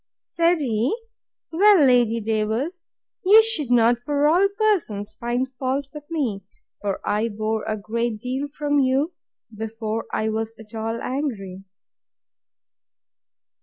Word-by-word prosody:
Said 335 -1 +1
he, 245 - 0 0.5
Well, 380 -2 +6
Lady 240 -3 +3
Davers, 225 - -2 0.3
you 425 +4 +8
should 440 - +2
not, 240 0 +4
of 245 +5 -18
all 300 +7 +4
persons, 225 - 0
find 240 +2 -1
fault 265 +2 -3
with 295 -1 -10
me; 250 - -2 0.4
for 200 -2 -2
I 215 +3 +1
bore 215 +1 -2
a 215 0 -2
great 230 +2 -2
deal 260 +5 -3
from 290 0 -1
you, 275 +5 +1 0.4
before 220 0 -4
I 220 - -1
was 220 +1 -3
at 220 -1 -14
all 225 +1 -3
angry. 205 -9 -4
245 Hz, 130 wpm, -23 LUFS, 220-295 Hz, 0.5 s, you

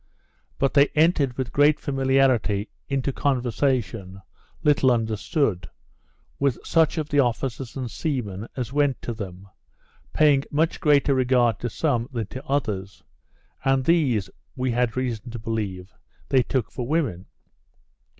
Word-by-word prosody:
But 135 - +1
they 140 0 +6
entered, 150 -5 +3
with 130 -2 -3
great 145 +1 +4
familiarity, 130 -7 +1 0.2
into 135 0 -1
conversation 120 -7 -1 0.4
(little 145 -4 +4
understood) 110 - 0 0.7
with 140 -4 +1
such 165 0 +2
of 155 -1 -2
the 145 - +2
officers 125 0 -1
and 125 -4 -4
seamen 110 - -3
as 125 0 -4
went 145 -3 +1
to 120 - -3
them, 95 -3 -8 0.6
paying 145 -3 +4
much 160 +3 0
greater 145 -4 +3
regard 125 -4 +2
to 120 - -3
some 125 -1 -1
than 115 -4 -3
to 130 - -6
others; 105 -9 -2 0.6
and 135 -1 +2
these, 135 - +2 0.3
we 125 0 -1
had 120 0 0
reason 125 -2 -3
to 120 - -6
believe, 105 -5 -4 0.4
they 135 -2 +4
took 125 -2 -2
for 125 -2 -5
women. 130 - -1
130 Hz, 135 wpm, -24 LUFS, 115-140 Hz, 0.7 s, they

